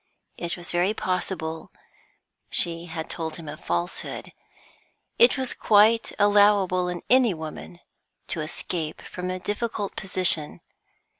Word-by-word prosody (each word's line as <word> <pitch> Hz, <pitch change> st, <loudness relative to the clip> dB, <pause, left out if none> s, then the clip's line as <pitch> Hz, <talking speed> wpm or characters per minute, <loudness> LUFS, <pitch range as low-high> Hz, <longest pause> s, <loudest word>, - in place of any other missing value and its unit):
It 170 Hz, 0 st, -4 dB
was 175 Hz, 0 st, -5 dB
very 180 Hz, +5 st, +1 dB
possible 170 Hz, -4 st, -3 dB, 0.8 s
she 170 Hz, 0 st, +2 dB
had 160 Hz, -1 st, -6 dB
told 160 Hz, -2 st, -4 dB
him 165 Hz, -2 st, -9 dB
a 145 Hz, -, -6 dB
falsehood; 85 Hz, -, -4 dB, 0.9 s
it 240 Hz, +3 st, +6 dB
was 260 Hz, -1 st, -1 dB
quite 220 Hz, +2 st, +4 dB
allowable 205 Hz, -3 st, +4 dB
in 180 Hz, -1 st, -4 dB
any 245 Hz, -6 st, +4 dB
woman, 160 Hz, +2 st, -8 dB, 0.5 s
to 160 Hz, -, -1 dB
escape 155 Hz, 0 st, -4 dB
from 180 Hz, 0 st, -6 dB
a 185 Hz, -, -2 dB
difficult 205 Hz, +1 st, -3 dB
position. 180 Hz, -5 st, +1 dB
180 Hz, 125 wpm, -25 LUFS, 165-205 Hz, 0.9 s, it